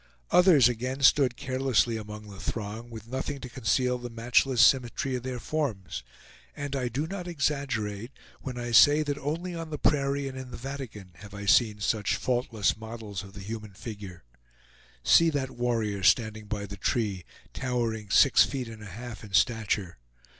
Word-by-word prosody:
Others 175 -9 +7
again 125 +3 -3
stood 135 -3 +5
carelessly 130 -3 +1
among 105 -1 -7
the 100 -2 -11
throng, 110 +3 -5
with 110 -2 -9
nothing 135 +3 -4
to 125 - -7
conceal 125 +1 0
the 120 0 -6
matchless 120 +2 +1
symmetry 130 +2 +3
of 125 - -3
their 130 0 -4
forms; 115 - -3 0.5
and 145 -1 -4
I 130 -2 -1
do 130 +6 -2
not 180 +1 -6
exaggerate 130 - -2 0.3
when 130 -2 -6
I 120 0 -4
say 145 +6 +7
that 145 -1 -3
only 165 +6 -3
on 165 -1 -5
the 150 - -4
prairie 140 -1 +1
and 135 - -6
in 130 -1 -7
the - - -8
Vatican 125 -8 -7
have 100 +2 -11
I 100 0 -6
seen 105 +1 +4
such 105 -1 +1
faultless 120 -4 0
models 110 -3 -7
of 100 -1 -12
the 100 - -9
human 105 0 -7
figure. 100 - -9 0.8
See 165 - +6
that 135 -4 -2
warrior 115 -5 -1
standing 110 +2 +2
by 105 -1 -3
the 100 0 -9
tree, 100 -3 -1 0.3
towering 115 -5 -2
six 135 +6 +6
feet 130 -4 -3
and 110 -1 -10
a 105 - -9
half 115 +5 -8
in 100 -3 -11
stature. 105 - +1
120 Hz, 175 wpm, -28 LUFS, 105-135 Hz, 0.8 s, Others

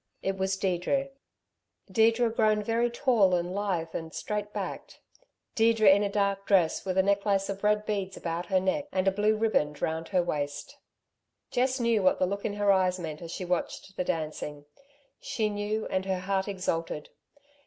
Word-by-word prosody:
It 195 0 0
was 190 0 -1
Deirdre 195 +9 0 0.8
Deirdre 225 +3 +3
grown 215 -2 +2
very 230 +2 +1
tall 235 -7 +3
and 175 +1 -2
lithe 185 -5 -2
and 160 -1 -5
straight 210 +3 -4
backed - - -6 0.5
Deirdre 225 -1 +3
in 195 +1 +7
a 205 - 0
dark 200 -1 0
dress 180 -5 +3
with 190 -1 -2
a 190 - +5
necklace 200 0 +1
of 200 0 -5
red 210 0 +2
beads 195 -3 -3
about 170 +1 -4
her 190 -2 +3
neck 190 +10 0
and 185 0 0
a - - +5
blue 210 +2 +2
ribband 150 -10 +1
round 160 +1 -2
her 185 -3 +1
waist. 145 -4 -4 0.7
Jess 255 +1 +1
knew 230 -3 +2
what 185 -1 +3
the 185 - +2
look 200 +2 -3
in 205 - -1
her 205 -1 +3
eyes 185 -1 +2
meant 160 -3 -6
as 170 - -7
she 180 - -5
watched 180 +2 -3
the - - -1
dancing; 150 -3 -4 0.5
she 215 -2 -1
knew 205 +1 -2
and 190 0 -1
her 190 -1 -1
heart 190 +1 -1
exulted. 165 -6 -3
195 Hz, 180 wpm, -28 LUFS, 180-210 Hz, 0.8 s, in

